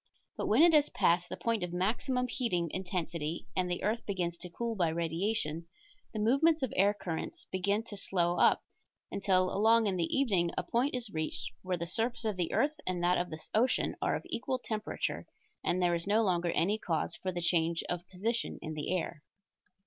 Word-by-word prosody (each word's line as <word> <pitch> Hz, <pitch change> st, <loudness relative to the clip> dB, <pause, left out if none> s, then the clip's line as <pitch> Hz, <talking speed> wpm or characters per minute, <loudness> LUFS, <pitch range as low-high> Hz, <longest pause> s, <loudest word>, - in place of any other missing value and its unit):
But -, -, -3 dB
when 230 Hz, +9 st, +5 dB
it 340 Hz, -1 st, +7 dB
has 295 Hz, -1 st, +5 dB
passed 175 Hz, +1 st, +2 dB
the -, -, -5 dB
point 230 Hz, -3 st, 0 dB
of 180 Hz, -1 st, -3 dB
maximum 240 Hz, +7 st, 0 dB
heating 180 Hz, -, -1 dB
intensity 170 Hz, -3 st, -3 dB
and 180 Hz, -1 st, +1 dB
the 175 Hz, -, -2 dB
earth 220 Hz, +4 st, 0 dB
begins 180 Hz, -4 st, -1 dB
to 180 Hz, -, -5 dB
cool 230 Hz, +6 st, -3 dB
by 175 Hz, -5 st, +2 dB
radiation, 165 Hz, 0 st, -1 dB, 0.4 s
the -, -, -6 dB
movements 275 Hz, +8 st, +3 dB
of 260 Hz, -, -1 dB
air 200 Hz, +2 st, +5 dB
currents 170 Hz, -5 st, -5 dB
begin 200 Hz, +4 st, +1 dB
to 220 Hz, -, -9 dB
slow 175 Hz, -3 st, 0 dB
up, -, -, +4 dB, 0.5 s
until 185 Hz, -2 st, +2 dB
along 225 Hz, +3 st, +5 dB
in 195 Hz, -3 st, +1 dB
the 170 Hz, -, +2 dB
evening 195 Hz, -11 st, +2 dB
a -, -, 0 dB
point 255 Hz, +4 st, +1 dB
is 240 Hz, -4 st, -2 dB
reached 155 Hz, -6 st, -3 dB
where 185 Hz, -1 st, -2 dB
the 170 Hz, -, -3 dB
surface 230 Hz, +6 st, -1 dB
of 215 Hz, -2 st, 0 dB
the 175 Hz, -2 st, -1 dB
earth 300 Hz, +2 st, +1 dB
and 180 Hz, -1 st, -1 dB
that 180 Hz, +1 st, +3 dB
of 175 Hz, -, -2 dB
the 155 Hz, 0 st, -8 dB
ocean 245 Hz, +4 st, +2 dB
are -, -, +1 dB
of -, -, -4 dB
equal 255 Hz, +2 st, -2 dB
temperature, 215 Hz, -3 st, -3 dB, 0.4 s
and 180 Hz, -, +1 dB
there 175 Hz, -1 st, +3 dB
is 170 Hz, +2 st, -2 dB
no 215 Hz, +3 st, +4 dB
longer 175 Hz, -3 st, +1 dB
any 195 Hz, +6 st, +1 dB
cause 165 Hz, -6 st, -1 dB
for 185 Hz, -, -3 dB
change 170 Hz, -1 st, +1 dB
of 175 Hz, +1 st, -4 dB
position 225 Hz, +6 st, -2 dB
in 155 Hz, -1 st, -5 dB
the 150 Hz, +2 st, -3 dB
air. 165 Hz, -2 st, -4 dB
185 Hz, 200 wpm, -32 LUFS, 170-225 Hz, 0.5 s, it